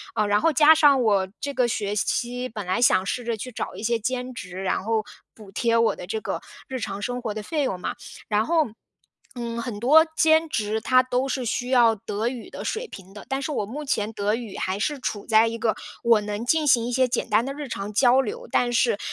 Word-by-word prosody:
呃， 210 - +1
然 205 +1 +2
后 330 - +3
加 305 +3 +7
上 290 -4 +5
我 200 -5 +2
这 285 - -3
个 250 -1 +2
学 205 -3 -2
期 245 +4 -1
本 215 -4 -6
来 185 +6 0
想 225 -5 +4
试 245 - -2
着 235 -1 -2
去 255 +4 -7
找 - - -5
一 - - -8
些 235 +1 +1
兼 250 +3 -3
职， 185 -5 -7
然 190 - -1
后 220 +1 0 0.3
补 210 -3 -14
贴 230 +3 +1
我 230 0 +3
的 - - -8
这 220 +3 -3
个 - - -3 0.3
日 260 -1 -4
常 200 -3 -4
生 245 +4 -3
活 220 -3 -3
的 215 - -5
费 300 +6 -1
用 190 -9 -2
嘛， - - -4 0.3
然 215 0 +1
后， 325 +1 +2 0.7
嗯， 235 -1 -4
很 230 -4 -5
多 300 +8 +6
兼 320 0 +4
职 215 -4 -1
它 255 +3 +4
都 255 +1 -1
是 265 -1 -2
需 245 +2 -2
要 235 -3 +5
德 210 +2 -3
语 245 -2 -5
的 - - -7
水 465 +2 -3
平 195 - -12
的， 210 - -10
但 270 0 -1
是 275 - -3
我 215 - -1
目 275 +9 -6
前 215 -6 -1
德 205 0 0
语 230 -4 -7
还 185 +1 -2
是 295 +5 -1
处 210 -5 -4
在 220 +1 +5
一 230 0 -3
个 225 -1 0 0.3
我 230 -2 +4
能 210 +2 -4
进 310 +4 +2
行 235 -4 +4
一 - - -3
些 255 +1 +3
简 245 - -2
单 215 +2 +3
的 275 - -3
日 290 0 -6
常 200 -4 -5
交 255 +3 +5
流， 480 - -6
但 245 -1 +2
是， 230 -2 +2
235 Hz, 260 characters per minute, -24 LUFS, 210-260 Hz, 0.7 s, 加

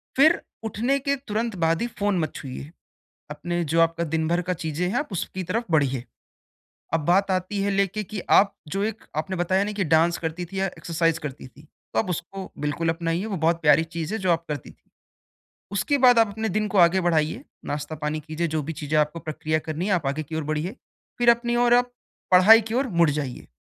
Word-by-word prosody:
फिर 315 +5 +5 0.2
उठने 235 +5 0
के 280 +1 0
तुरंत 220 +1 -2
बाद 165 +3 +2
ही 240 - 0
फ़ोन 205 -2 +1
मत 155 -2 -2
छुइए। 135 +3 -7 0.6
अपने 175 +4 -3
जो 165 - +5
आपका 165 0 +2
दिनभर 160 +2 0
का 180 +1 -2
चीज़ें 160 +1 -2
हैं 190 - -2
आप 295 -7 -5
उसकी 185 +1 -4
तरफ 230 +4 -1
बढ़िए। 135 -5 +2 0.9
अब 165 - +3
बात 190 +3 +3
आती 185 +2 -1
है 200 0 0
लेके 200 +2 0
कि 205 +1 -6 0.2
आप 200 0 +4 0.2
जो 200 - 0
एक 220 +1 -3 0.2
आपने 190 +2 -5
बताया 185 +3 +2
ना 210 - -3
कि 195 - +3
डांस 170 +2 +3
करती 165 +2 -4
थी 195 - -3
या 195 - +1
एक्सरसाइज़ 165 -2 -1
करती 135 -3 -7
थी, 135 +3 -18 0.3
तो - - +2
आप 205 - -1
उसको 185 +3 -5
बिल्कुल 165 +3 -1
अपनाइए, 165 +3 -1
वो 205 -4 -3
बहुत 165 +1 +1
प्यारी 160 +1 +5
चीज़ 165 +4 -3
है 220 - -1
जो 185 -2 +1
आप 165 0 0
करती 150 -1 -5
थी। - - -29 0.8
उसके 200 +9 +1
बाद 250 -2 +6
आप 225 - +5
अपने 220 +2 -3
दिन 215 0 0
को 200 - 0
आगे 175 +1 +5
बढ़ाइए, 160 -3 0 0.2
नाश्ता 145 +2 -4
पानी 150 +1 -1
कीजिए, 160 +2 -3
जो 155 -1 -2
भी 160 +3 -4
चीज़ें 155 +1 +1
आपको 150 +2 +1
प्रक्रिया 155 +1 -1
करनी 160 +5 -2
है 205 - +1
आप 160 -6 -1
आगे 145 +3 -1
की 155 +2 -8
ओर 160 - -2
बढ़िए, 160 +9 -2 0.4
फिर 240 -1 +6
अपनी 240 0 +1
ओर 240 0 +4
आप 245 0 +2 0.4
पढ़ाई 195 +5 +8
की - - -2
ओर 265 +2 +1
मुड़ 165 -3 +5
जाइए। 140 -4 -4
175 Hz, 220 wpm, -24 LUFS, 160-205 Hz, 0.9 s, पढ़ाई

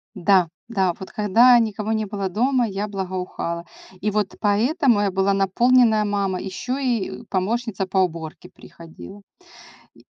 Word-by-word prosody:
Да, 185 -1 +3 0.2
да, 190 -6 0
вот 190 - -9
когда 230 +4 +5
никого 215 -1 -2
не 220 -1 0
было 200 -2 -4
дома, 245 +4 +1
я 200 +1 -4
благоухала. 185 -3 -4 0.4
И 210 - 0
вот 210 -2 -2
поэтому 230 - +2
я 200 -2 0
была 195 +1 +1
наполненная 220 +3 +3
мама, 200 -3 -1
ещё 245 +7 -4
и 240 -4 -2
помощница 205 +1 -2
по 190 0 0
уборке 165 -4 -3
приходила. 170 +4 -13 0.7
И - - -21
205 Hz, 140 wpm, -22 LUFS, 190-230 Hz, 0.7 s, когда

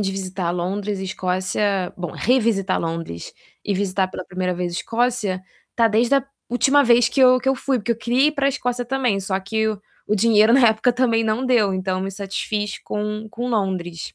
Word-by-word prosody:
de 195 -2 0
visitar 185 -2 -3
Londres 195 +3 -2
e 190 - -4
Escócia, 185 +1 -1
bom, 175 -3 -5
revisitar 220 -6 +1
Londres 165 - -5 0.3
e 205 - -1
visitar 190 -1 0
pela 185 -1 -7
primeira 180 0 -2
vez 175 0 -3
Escócia, 225 -1 -1 0.4
tá 230 - +4
desde 230 +5 +3
a 275 - 0 0.2
última 270 +4 +3
vez 240 -2 +4
que 265 +3 -1
eu 255 0 +6
que 265 +2 -2
eu 270 - +3
fui, 265 -1 -1
porque 235 +3 -1
eu - - -6
queria 245 +5 +2
ir - - -2
pra 280 -2 +1
Escócia 245 -3 -2
também, 245 -5 0
só 190 0 -1
que 220 +3 -1
o 210 -2 -4 0.3
o 210 - +2
dinheiro 215 +1 +4
na 245 -2 +6
época 220 +3 +2
também 235 -3 +1
não 220 +4 0
deu, 220 -7 +2
então 185 0 -2
me 195 +1 -4
satisfiz 205 +1 -3
com 210 +1 -4
com 240 +3 -5
Londres. 185 -6 -3
210 Hz, 200 wpm, -21 LUFS, 190-240 Hz, 0.4 s, eu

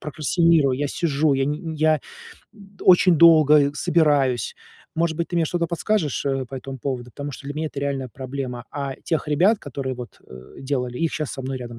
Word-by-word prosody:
прокрастинирую, 155 -2 +2
я 145 - -1
сижу, 150 -2 +1
я 135 - +1
ни 150 +1 -1
нь 165 -2 -6
я, 155 -1 +2 0.5
м, 200 -2 -17
очень 180 -1 +6
долго, 155 -3 +7
э, - - -5
собираюсь. 145 -8 +1 0.4
Может 165 -1 0
быть, 170 - -2
ты 175 - -3
мне 170 - +3
что-то 170 +2 -1
подскажешь, 170 - -1
э, 135 -1 -1
по 135 - -9
этому 135 +1 -7
поводу, 130 -2 -3
потому 145 +3 -6
что 140 - -10
для 145 - -5
меня 155 +1 -2
это 145 -2 -6
реальная 140 -2 -2
проблема, 130 -1 -6
а 140 -2 -4
тех 160 -2 -1
ребят, 185 +9 +3
которые 135 -3 -5
вот, 120 -4 -10
э, 65 0 -13
делали, 125 -3 -3
их 165 -1 0
щас 155 -3 -3
со 135 - -6
мной 130 0 -4
рядом 120 -2 -8
145 Hz, 210 wpm, -22 LUFS, 135-160 Hz, 0.5 s, долго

